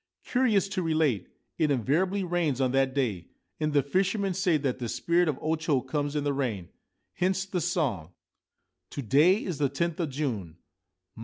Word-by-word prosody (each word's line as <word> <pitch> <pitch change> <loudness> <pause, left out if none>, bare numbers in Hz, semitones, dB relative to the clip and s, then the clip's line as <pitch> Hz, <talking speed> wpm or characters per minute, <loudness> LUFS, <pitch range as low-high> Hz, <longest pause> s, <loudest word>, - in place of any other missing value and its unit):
Curious 230 -6 +2
to 195 -2 -2
relate, 155 - +1 0.3
it 155 - +3
invariably 165 - +1
rains 170 -7 0
on 130 -2 +2
that 135 0 +1
day, 110 -11 -1 0.3
and 155 0 0
the 145 -2 +3
fishermen 195 - 0
say 180 -3 +2
that 135 -3 -2
the 120 -2 -3
spirit 170 +7 +1
of 150 -4 0
O 160 +1 +1
Cho 155 -4 +1
comes 145 +3 -3
in 150 - 0
the 145 -1 0
rain. 115 -11 -2 0.4
Hence 190 +1 0
the 190 -2 -2
song: 145 - -1 0.4
— - - -55
To 140 - -4
day 155 - +4
is 175 -6 -4
the 140 -2 +2
tenth 165 +5 -2
of 165 -4 -1
June. 115 - -3
150 Hz, 180 wpm, -28 LUFS, 135-180 Hz, 0.4 s, day